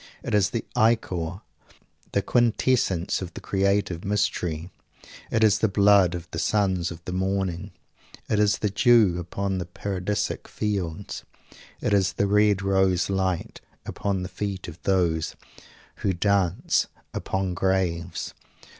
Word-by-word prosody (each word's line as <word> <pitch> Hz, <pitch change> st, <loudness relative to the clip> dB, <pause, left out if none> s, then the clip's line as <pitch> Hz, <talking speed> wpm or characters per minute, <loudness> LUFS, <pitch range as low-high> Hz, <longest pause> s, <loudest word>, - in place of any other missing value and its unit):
It -, -, -4 dB
is 100 Hz, -1 st, +4 dB
the 115 Hz, +1 st, -3 dB
ichor, 95 Hz, -5 st, +1 dB, 0.7 s
the 100 Hz, -, +1 dB
quintessence 115 Hz, -7 st, +1 dB
of 90 Hz, -2 st, -7 dB
the -, -, -5 dB
creative 100 Hz, -3 st, 0 dB
mystery. 95 Hz, -5 st, -1 dB, 0.6 s
It 110 Hz, -, +2 dB
is 105 Hz, -3 st, +5 dB
the 110 Hz, -, +3 dB
blood 100 Hz, -3 st, +4 dB
of 85 Hz, -1 st, -7 dB
the 80 Hz, -, -3 dB
sons 95 Hz, -4 st, +1 dB
of 85 Hz, 0 st, -10 dB
the -, -, -4 dB
morning. 95 Hz, -1 st, -1 dB, 0.6 s
It 105 Hz, -, +1 dB
is 105 Hz, -2 st, +3 dB
the 105 Hz, -, -1 dB
dew 110 Hz, -5 st, +4 dB
upon 95 Hz, +2 st, -2 dB
the 90 Hz, -, -4 dB
paradisic 100 Hz, +3 st, -3 dB
fields. 100 Hz, -4 st, -3 dB, 0.6 s
It -, -, 0 dB
is 100 Hz, -1 st, +3 dB
the 100 Hz, -, +1 dB
red 105 Hz, -1 st, +3 dB
rose 95 Hz, -1 st, +2 dB
light, 95 Hz, -2 st, -1 dB, 0.2 s
upon 100 Hz, -2 st, -2 dB
the -, -, -3 dB
feet 100 Hz, -3 st, -4 dB
of 85 Hz, 0 st, -10 dB
those 85 Hz, -4 st, +1 dB, 0.6 s
who 95 Hz, -, 0 dB
dance 95 Hz, -1 st, +1 dB, 0.3 s
upon 95 Hz, -1 st, -2 dB
graves. 90 Hz, -2 st, -1 dB
95 Hz, 135 wpm, -25 LUFS, 90-105 Hz, 0.7 s, is